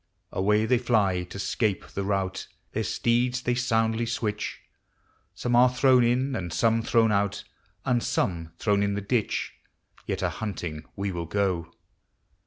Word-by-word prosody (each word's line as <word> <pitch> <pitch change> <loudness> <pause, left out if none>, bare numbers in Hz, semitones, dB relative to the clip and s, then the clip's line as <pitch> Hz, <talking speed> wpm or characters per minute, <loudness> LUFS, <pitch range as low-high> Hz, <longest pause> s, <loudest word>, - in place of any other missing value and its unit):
Away 105 +3 +2
they 120 +2 +3
fly 105 -7 +2
to 90 - -9
'scape 100 -1 -1
the 100 - -3
rout, 95 -1 -2 0.2
Their - - -1
steeds 125 +2 +1
they 125 - +1
soundly 115 -2 +1
switch; 105 -3 -3 0.7
Some 120 -1 0
are 125 +1 +7
thrown 125 0 +4
in, 130 +3 +1
and 90 -6 -4
some 115 +4 +2
thrown 115 -1 +3
out, 100 0 0 0.4
And 125 -2 +2
some 85 -7 -1
thrown 100 0 +2
in 100 0 +1
the 100 - -2
ditch. 110 +2 -1 0.5
Yet - - -2
a - - +2
hunting 85 -8 -5
we 100 0 -2
will 85 -2 -4
go. 90 -3 -1
105 Hz, 155 wpm, -26 LUFS, 95-120 Hz, 0.7 s, are